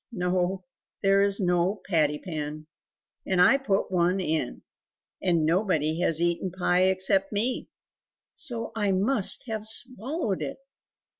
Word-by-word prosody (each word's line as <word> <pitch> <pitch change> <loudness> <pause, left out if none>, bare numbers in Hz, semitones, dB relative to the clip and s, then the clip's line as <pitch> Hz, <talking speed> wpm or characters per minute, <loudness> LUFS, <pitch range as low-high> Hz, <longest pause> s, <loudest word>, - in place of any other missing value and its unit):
"No; 180 -1 -1 0.4
there 195 0 +4
is 200 +1 +2
no 180 +2 +1
patty 155 -5 +2
pan, 155 -3 -6 0.6
and 185 -2 0
I 260 +10 +6
put 200 -8 -1
one 180 +1 +2
in; 155 -7 -2 0.6
and 170 -4 +2
nobody 165 -3 +1
has 165 -2 +3
eaten 170 +2 0
pie 180 0 +2
except 190 +1 +1
me, 225 +5 -1 0.6
so 245 -7 -3
I 205 -3 +1
must 200 +2 +2
have 220 -2 -4
swallowed 240 - -2
it!" 145 - -4
185 Hz, 130 wpm, -27 LUFS, 170-205 Hz, 0.6 s, I